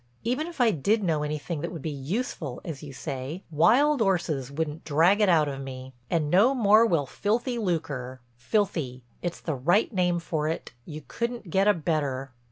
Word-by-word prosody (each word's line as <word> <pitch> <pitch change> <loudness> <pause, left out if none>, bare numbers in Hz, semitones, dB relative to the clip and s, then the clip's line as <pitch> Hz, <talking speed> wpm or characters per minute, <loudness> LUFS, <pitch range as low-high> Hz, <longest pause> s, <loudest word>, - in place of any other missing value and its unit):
Even 255 +8 -1
if 340 -4 -10
I 240 -3 +5
did 205 +7 +1
know 160 -5 +1
anything 150 +1 -3
that 170 - -3
would 165 -5 -7
be 155 - -2
'useful' 145 - -4
as 155 -5 -6
you 145 - -8
say, 135 +5 -5
wild 250 - +4
'orses 165 - 0
wouldn't 150 +2 -3
drag 170 +8 +3
it 205 - +4
out 160 -4 +4
of 135 -1 -4
me. 130 -1 -8 0.2
And 155 -3 0
no 225 +9 +5
more 220 -1 +5
will 165 -8 +1
filthy 235 - -1
lucre. 145 - -3 0.2
Filthy—it's 130 - -2
the 160 - -2
right 175 - +2
name 180 -2 +2
for 160 -2 -2
it, 160 -4 -4
you 155 -1 -8
couldn't 235 -6 -4
get 195 +3 +3
a 210 - +6
better." 145 -5 -2
165 Hz, 180 wpm, -27 LUFS, 145-205 Hz, 0.2 s, a